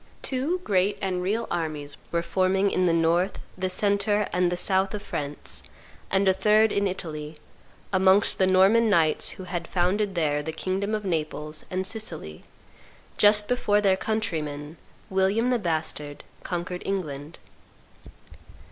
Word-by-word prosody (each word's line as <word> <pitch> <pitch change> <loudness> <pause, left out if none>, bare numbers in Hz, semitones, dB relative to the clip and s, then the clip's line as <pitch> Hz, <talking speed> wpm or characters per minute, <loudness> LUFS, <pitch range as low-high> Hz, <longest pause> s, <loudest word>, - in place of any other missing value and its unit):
Two 285 +8 0
great 195 - +1
and 185 -2 -2
real 215 +5 -1
armies 150 -3 -3 0.2
were 170 0 0
forming 190 +3 +1
in 185 -1 +2
the - - +3
north, 165 +3 +1 0.2
the 185 0 -2
centre, 205 +2 +1
and 180 -1 +2
the 175 - -1
south 190 +2 +1
of 205 - -6
France, 145 0 -5 0.5
and 195 0 +2
a 190 - +5
third 210 +3 +3
in 200 0 +1
Italy, 155 -4 -5 0.6
amongst 190 +2 +4
the 190 - +4
Norman 195 +5 +4
knights 165 -6 +3
who 185 - -7
had 175 -2 -4
founded 190 +3 0
there 150 -3 +1
the 160 +2 -4
kingdom 190 +6 -2
of 210 -1 -5
Naples 155 -3 -3
and 185 +1 -2
Sicily, 180 - -3 0.8
just 210 0 +5
before 210 -4 +2
their 195 -2 +3
countryman, 160 -8 -3 0.3
William 195 +6 +2
the 245 - +2
Bastard, 155 -5 -3 0.2
conquered 180 0 -4
England. 155 -5 -4
185 Hz, 145 wpm, -25 LUFS, 165-205 Hz, 0.8 s, a